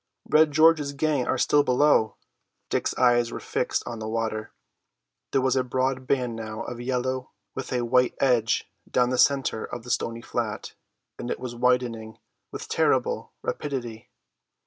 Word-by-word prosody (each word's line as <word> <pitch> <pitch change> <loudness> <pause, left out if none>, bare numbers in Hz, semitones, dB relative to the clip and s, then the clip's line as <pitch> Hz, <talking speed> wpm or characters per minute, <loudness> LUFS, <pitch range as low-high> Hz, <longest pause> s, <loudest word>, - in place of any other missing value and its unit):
"Red 155 0 +5
George's 155 -1 +4
gang 140 -3 0
are - - +1
still 145 - +4
below!" 130 -4 +3 0.6
Dick's - - -1
eyes 120 -2 +3
were - - -5
fixed - - -1
on 120 -2 -6
the 110 - -5
water. 110 -1 -2 0.8
There 135 - +2
was 130 0 +2
a 130 - +2
broad 130 +1 -1
band 125 -4 0
now 110 0 -5
of 120 0 -6
yellow 130 +1 -2 0.2
with 135 - -6
a 125 -2 0
white 125 +1 +3
edge 120 -4 +2 0.2
down 125 0 +2
the 130 - 0
centre 135 -5 +2
of 120 - -7
the 125 - -5
stony 115 0 -1
flat, 115 -3 -4 0.5
and 120 - -5
it - - -2
was 125 -1 -5
widening 120 -3 0 0.3
with - - -7
terrible - - 0
rapidity. 120 -5 -4
125 Hz, 160 wpm, -26 LUFS, 115-130 Hz, 0.8 s, Red